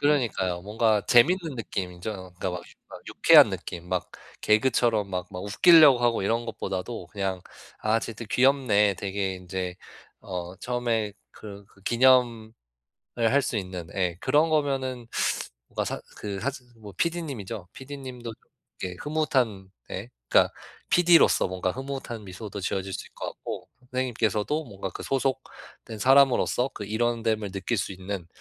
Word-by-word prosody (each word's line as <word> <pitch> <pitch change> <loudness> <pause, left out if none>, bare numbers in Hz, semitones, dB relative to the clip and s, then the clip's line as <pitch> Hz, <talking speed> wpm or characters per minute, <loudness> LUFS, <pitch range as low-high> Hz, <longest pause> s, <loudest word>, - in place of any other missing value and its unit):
그러니까요. 115 -11 +1
뭔가 110 +1 +2
재밌는 160 +5 +4
느낌이죠. 90 -3 -4
그러니까 95 -1 -5
막 90 0 -5 0.3
막 - - -10
유쾌한 - - +7
느낌. 85 0 -6
막 90 -1 -1 0.3
개그처럼 110 -2 +2
막 90 0 -3
막 90 - -5
웃기려고 150 - +7
하고 120 -3 +1
이런 115 +4 0
것보다도 95 -1 -4
그냥 95 -2 -3 0.4
'아 110 +1 +2
쟤들 115 0 -7
귀엽네.' 125 -6 +3
되게 95 0 -2
인제 90 0 -5 0.5
어 90 -1 -6
처음에 115 -4 -1 0.2
그르 100 -1 -10
그 95 - -24
기념을 120 -1 +3 0.6
할 120 +4 +3
수 120 - -2
있는 90 -4 -5
예 90 -3 0
그런 155 +3 +3
거면은 135 -5 0 0.6
뭔가 - - -2
사 - - -4 0.2
그 100 -2 -5
사즈 140 0 -3
즈 120 -2 -24
뭐 105 -2 -11
PD님이죠. 130 - -3
PD님도 130 -4 -8 0.5
이렇게 90 -1 -4
흐뭇한 130 -11 0 0.2
네 - - -6 0.2
그러니까 - - +4 0.4
PD로서 175 -1 +5
뭔가 95 0 -2
흐뭇한 130 -5 -6
미소도 100 +2 -7
지어질 95 +1 -2
수 - - -3
있을 - - -18
것 - - -5
같고 - - -7 0.2
선생님께서도 125 +3 0
뭔가 95 -4 -6
그 - - -8
소속된 130 -4 -4
사람으로서 135 0 +4
그 105 - -6
일원 115 +2 0
됨을 110 -3 0
느낄 100 +4 -2
수 100 - -2
있는 95 -1 -6
110 Hz, 320 characters per minute, -26 LUFS, 95-130 Hz, 0.6 s, 유쾌한